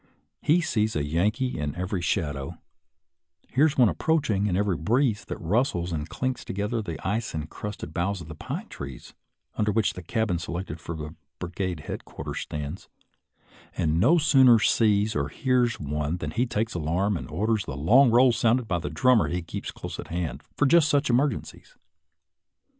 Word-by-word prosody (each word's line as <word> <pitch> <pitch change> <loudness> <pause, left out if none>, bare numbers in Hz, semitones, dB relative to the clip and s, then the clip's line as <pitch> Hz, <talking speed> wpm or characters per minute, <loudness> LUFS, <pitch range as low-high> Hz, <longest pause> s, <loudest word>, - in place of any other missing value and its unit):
He 170 +4 +3
sees 110 -8 0
a 75 - 0
Yankee 100 - 0
in 75 -1 -3
every 90 +1 -2
shadow, 75 -6 -2 0.9
hears 150 +3 +2
one 125 -3 +6
approaching 110 -7 +1
in 90 -3 0
every 100 -2 +1
breeze 110 - +1
that - - -5
rustles 90 - 0
and 80 -1 -3
clinks 130 +6 -3
together 105 +4 -2
the 85 -6 -5
ice 110 -1 -2
incrusted 80 +7 -6
boughs 95 +2 -1
of 85 - -9
the 80 - -7
pine - - -6
trees 70 -3 -9 0.4
under 105 0 +1
which 110 0 +1
the 90 - -8
cabin 100 -1 -1
selected 85 -1 -5
for 80 -2 -6 0.2
brigade 90 -2 -4
headquarters - - -6
stands, 75 +4 -6 0.9
and 80 0 +1
no 140 - +5
sooner 135 -6 +6
sees 105 -1 +2
or 70 -1 0
hears 125 - +1
one 75 +2 -2
than 90 - -4
he 125 +2 0
takes 110 0 -1
alarm 90 +5 0
and 85 - -5
orders 105 +6 0
the 65 - -5
long 120 - +5
roll 125 +2 +6
sounded 120 0 +2
by 85 -3 0
the 90 - -4
drummer 125 -4 +3
he 90 0 -2
keeps 85 - -6
close - - -7
at - - -6
hand 85 -1 -3 0.2
for 145 - +3
just 155 +2 +5
such 145 -2 +2
emergencies. 145 - -1
100 Hz, 170 wpm, -26 LUFS, 85-120 Hz, 0.9 s, one